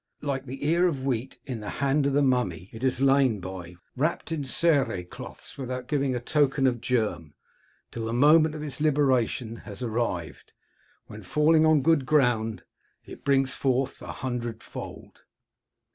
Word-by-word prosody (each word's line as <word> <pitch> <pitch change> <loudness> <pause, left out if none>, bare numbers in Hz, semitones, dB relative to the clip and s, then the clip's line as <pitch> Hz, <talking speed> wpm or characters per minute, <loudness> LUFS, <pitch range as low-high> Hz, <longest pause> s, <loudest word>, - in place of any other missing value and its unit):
Like 135 -2 -3
the 135 +3 -6
ear 170 +3 +4
of 140 -6 -2
wheat 130 -1 -2
in 125 -5 -4
the 105 - -6
hand 140 +1 +2
of 140 - 0
the 145 +1 +3
mummy, 110 -9 0
it 110 - -9
has 130 -1 0
lain 135 -5 +4
by, 90 -1 -8 0.2
wrapped 155 +4 -1
in 155 -3 -2
cere 135 - +1
cloths, 90 - -10
without 125 -1 -4
giving 135 -4 0
token 140 0 +2
of 120 -3 +1
germ, 105 - -1 0.6
till 115 -1 -4
the - - -2
moment 155 +5 +5
of 150 - -5
its 150 -1 -5
liberation 130 -6 +1
has 105 +2 -9
arrived, 110 -8 -3 0.5
when, 105 - -10
falling 155 - +3
on 155 -3 +4
good 145 -4 +3
ground, 120 -7 +2 0.4
it - - -11
brings 135 -1 +2
forth 135 0 -1
a - - -6
hundredfold. 120 -3 -6
130 Hz, 160 wpm, -26 LUFS, 115-145 Hz, 0.6 s, moment